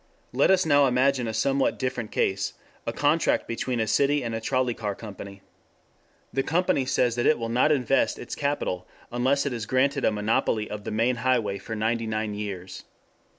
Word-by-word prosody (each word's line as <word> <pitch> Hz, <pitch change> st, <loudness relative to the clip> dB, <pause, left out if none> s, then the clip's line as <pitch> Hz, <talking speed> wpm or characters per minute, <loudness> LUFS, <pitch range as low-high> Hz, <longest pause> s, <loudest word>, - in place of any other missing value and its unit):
Let -, -, +3 dB
us 190 Hz, -2 st, +4 dB
now 145 Hz, -2 st, +5 dB
imagine 130 Hz, 0 st, +2 dB
a -, -, -1 dB
somewhat 135 Hz, +5 st, +1 dB
different 130 Hz, -4 st, -3 dB
case: 100 Hz, +1 st, 0 dB, 0.3 s
a -, -, +1 dB
contract 150 Hz, +3 st, +1 dB
between 120 Hz, +1 st, -2 dB
a 110 Hz, -, +1 dB
city 140 Hz, +6 st, +2 dB
and 115 Hz, -1 st, -3 dB
a 115 Hz, -, -3 dB
trolley 130 Hz, 0 st, 0 dB
car 105 Hz, -3 st, -4 dB
company. 100 Hz, -2 st, -10 dB, 0.9 s
The 135 Hz, -, +1 dB
company 160 Hz, -2 st, +1 dB
says 125 Hz, -2 st, +1 dB
that 120 Hz, +1 st, 0 dB
it 155 Hz, -, +4 dB
will 115 Hz, -1 st, -4 dB
not 125 Hz, +6 st, +3 dB
invest 135 Hz, -2 st, +2 dB
its 120 Hz, -, -7 dB
capital 140 Hz, -11 st, -2 dB, 0.2 s
unless 130 Hz, +4 st, +1 dB
it 140 Hz, -, -1 dB
is 115 Hz, -3 st, -4 dB
granted 140 Hz, +2 st, +1 dB
a -, -, +3 dB
monopoly 105 Hz, 0 st, 0 dB
of 105 Hz, -1 st, -7 dB
the -, -, -3 dB
main 115 Hz, +3 st, +1 dB
highway 115 Hz, -5 st, 0 dB
for 110 Hz, -, -6 dB
ninety 115 Hz, +1 st, -1 dB
nine 110 Hz, -1 st, -2 dB
years. 95 Hz, -3 st, -6 dB
120 Hz, 190 wpm, -26 LUFS, 110-135 Hz, 0.9 s, now